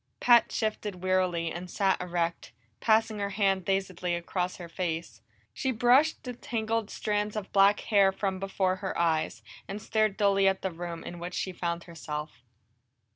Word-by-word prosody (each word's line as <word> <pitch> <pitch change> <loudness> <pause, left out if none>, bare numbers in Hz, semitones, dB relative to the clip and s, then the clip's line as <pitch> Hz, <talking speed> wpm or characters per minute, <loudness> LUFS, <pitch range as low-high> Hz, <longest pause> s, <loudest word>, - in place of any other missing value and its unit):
Pat 240 -1 +5
shifted 210 -4 -3
wearily, 180 -3 +1
and 180 +1 -6
sat 190 0 +1
erect, 170 -5 -2 0.3
passing 220 -1 +2
her 200 0 -1
hand 195 -2 +1
dazedly 185 -2 -1
across 180 +1 -2
her 175 - -8
face. 165 - -4 0.3
She 260 - -1
brushed 255 +7 +3
the 250 - -5
tangled 225 -2 -2
strands 210 0 -1
of 210 -2 -5
black 200 +1 +5
hair 200 -3 +4
from 190 -1 -2
before 190 -1 0
her 190 0 -4
eyes, 165 -2 0 0.2
and 200 +1 -5
stared 215 -1 0
dully 200 -2 +4
at 190 0 +1
the 190 - -1
room 170 0 -6
in 175 - -7
which 175 +1 -5
she 190 - -2
found 170 -1 -3
herself. 150 -4 -7
190 Hz, 165 wpm, -29 LUFS, 175-210 Hz, 0.3 s, Pat